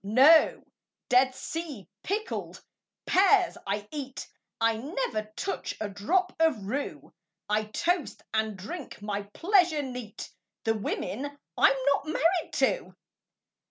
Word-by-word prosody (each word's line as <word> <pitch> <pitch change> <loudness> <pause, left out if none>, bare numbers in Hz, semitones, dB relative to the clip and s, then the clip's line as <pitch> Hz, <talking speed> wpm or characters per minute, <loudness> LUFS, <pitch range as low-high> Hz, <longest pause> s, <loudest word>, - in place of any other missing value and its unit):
No 265 +11 +6 0.5
Dead 255 +1 +4
Sea 295 - -5
pickled 425 - -3 0.4
pears 380 -1 +4
I 205 +1 -2
eat; 270 -3 -6 0.3
I 225 -1 +3
never 265 - -3
touch 390 - -3
a 215 - -2
drop 360 - 0
of 305 -11 +2
rue; 275 +8 -4 0.3
I 215 +1 +1
toast, 335 +8 -1
and 220 -2 0
drink 255 - -7
my 205 -1 -2
pleasure 350 -5 +3
neat, 250 -5 -7 0.3
The 225 - +2
women 260 +6 -3 0.2
I'm 275 - +5 0.2
not 290 - -6
married 330 +3 +1
to! - - 0
270 Hz, 120 wpm, -28 LUFS, 215-340 Hz, 0.5 s, No